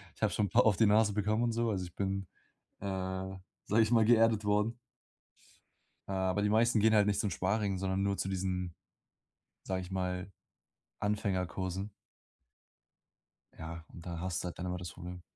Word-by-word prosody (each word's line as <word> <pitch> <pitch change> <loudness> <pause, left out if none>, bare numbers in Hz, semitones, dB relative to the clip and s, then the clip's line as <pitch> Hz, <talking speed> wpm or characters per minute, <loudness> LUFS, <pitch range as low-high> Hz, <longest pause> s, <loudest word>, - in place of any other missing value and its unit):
Ich - - -22
habe 110 - +3
schon 105 - +1
'n - - -9
paar - - +4
auf 105 -3 +4
die 110 - +5
Nase 105 0 +4
bekommen 105 +3 +1
und 120 - +2
so, 115 0 0
also, 95 -3 -1
ich 85 - -11
bin, 95 -1 -2 0.5
äh, 100 - -7 0.8
sage 110 +2 +3
ich 110 +1 +2
mal, 115 -2 +5
geerdet 115 -2 +4
worden. 105 +3 +1 1.3
Äh, - - -4
aber 95 +1 +1
die 105 - +2
meisten 115 +1 +4
gehen 110 +1 +4
halt 105 -1 +5
nicht 100 - +1
zum 105 - +1
Sparring, 100 +1 0
sondern 95 +1 -1
nur 100 -1 0
zu 95 - -2
diesen, 90 -2 -2 0.9
sage 95 -1 -2
ich 90 - -9
mal: 90 0 -2 0.7
„Anfängerkursen“. 95 -1 -1 1.6
Ja, 85 +1 -7
und 85 - -11
da 85 -2 -5
hast 90 -1 -2
du - - -5
halt 85 - -7
dann 90 - -3
immer 90 0 -2
das 90 -1 -6
Problem. 90 0 -8
100 Hz, 185 wpm, -32 LUFS, 90-110 Hz, 1.6 s, die